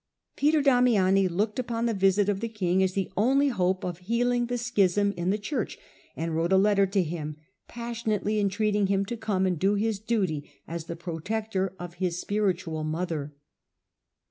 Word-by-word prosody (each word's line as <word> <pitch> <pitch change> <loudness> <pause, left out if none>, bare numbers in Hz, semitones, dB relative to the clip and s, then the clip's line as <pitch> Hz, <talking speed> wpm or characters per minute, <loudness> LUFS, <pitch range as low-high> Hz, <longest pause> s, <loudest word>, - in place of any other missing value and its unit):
Peter 300 +1 +3
Damiani 215 -8 +4
looked 210 +6 -1
upon 235 -2 -2
the 230 - +1
visit 195 0 +3
of 200 -2 0
the 230 +2 -3
king 190 -4 0
as 190 -1 +1
the 195 -1 -2
only 270 +7 +3
hope 185 -5 0
of 175 -1 -4
healing 240 +5 0
the 245 0 -2
schism 205 -4 +2
in 175 +1 -1
the 205 - +2
Church, 220 +2 -3 0.4
and 165 0 -3
wrote 165 +3 0
a 190 - +6
letter 200 0 +4
to 195 0 +1
him 155 -2 -5 0.3
passionately 225 -3 -2
entreat 205 +1 +1
ing 205 -2 +2
him 195 0 +1
to 240 - -4
come 200 -4 0
and 180 -4 0
do 195 +4 +2
his 215 0 0
duty 190 -10 -1 0.2
as 165 -1 -5
the 170 - -5
protector 190 +3 -3
of 175 -1 -7
his 180 -1 0
spiritual 185 -7 -1
mother. 155 -2 -3
195 Hz, 180 wpm, -27 LUFS, 180-220 Hz, 0.4 s, a